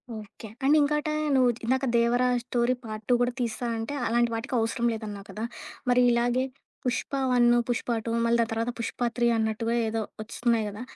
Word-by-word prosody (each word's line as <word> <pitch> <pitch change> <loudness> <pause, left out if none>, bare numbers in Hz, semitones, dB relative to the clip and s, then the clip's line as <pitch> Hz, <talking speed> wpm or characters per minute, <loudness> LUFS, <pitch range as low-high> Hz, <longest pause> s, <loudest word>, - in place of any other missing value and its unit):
Okay. 215 +1 -10 0.2
And 280 +3 +5
ఇంకోట 300 +1 +1 0.3
నువ్వు 255 -2 +5 0.2
ఇందాక 260 +2 +1
'Devara' 240 +2 +3 0.2
story 245 0 +1
part 215 -1 -6
2 - - +5
కూడా 245 0 +2
తీస్తాను 235 0 -2
అంటే 225 +6 -4
అలాంటి 235 +1 +2
వాటికి 245 +4 -5
అవసరం 230 +2 -1
లేదు 220 0 -6
అన్నావు 200 -1 -7
కదా. 215 - -6 0.5
మరి 250 0 +5
ఇలాగే 240 +2 +2 0.4
పుష్ప 250 0 -1 0.2
వన్ను, 240 -1 +5
పుష్ప 240 0 -1 0.2
2 230 - -2
మళ్ళీ 235 0 +3
దాని 225 - -1
తరువాత 230 +2 -1
పుష్ప 230 - -4 0.2
3 240 -1 +2
అన్నట్టుగా 220 +1 0
ఏదో 225 0 -1 0.2
ఒస్తున్నాయి 230 0 0
కదా 205 +3 -8
235 Hz, 180 wpm, -27 LUFS, 225-245 Hz, 0.5 s, And